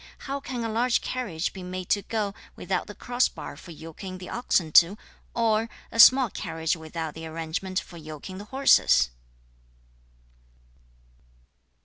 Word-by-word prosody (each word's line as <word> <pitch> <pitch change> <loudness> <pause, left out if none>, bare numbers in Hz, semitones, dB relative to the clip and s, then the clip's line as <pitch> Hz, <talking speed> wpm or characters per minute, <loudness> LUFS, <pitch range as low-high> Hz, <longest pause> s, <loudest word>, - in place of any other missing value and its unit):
How 275 0 -3
can 250 -3 -5
a - - -1
large 235 +3 +2
carriage 205 -11 -3
be 190 - -8
made 180 0 -5
to 205 - +3
go 210 -2 -2 0.2
without - - -2
the - - -9
cross 245 +1 +1
bar - - -8
for - - -13
yoking 165 +3 -8
the 180 - -9
oxen 190 -9 0
to, 175 +6 +6 0.4
or 225 -1 +2 0.2
a 230 - -5
small 255 -1 +8
carriage 160 0 -2
without 160 -1 -5
the 160 0 -7
arrangement 165 +4 -3
for 175 - -11
yoking 155 +4 -8
the 205 - -8
horses?' 215 - +4
185 Hz, 145 wpm, -26 LUFS, 165-230 Hz, 0.4 s, small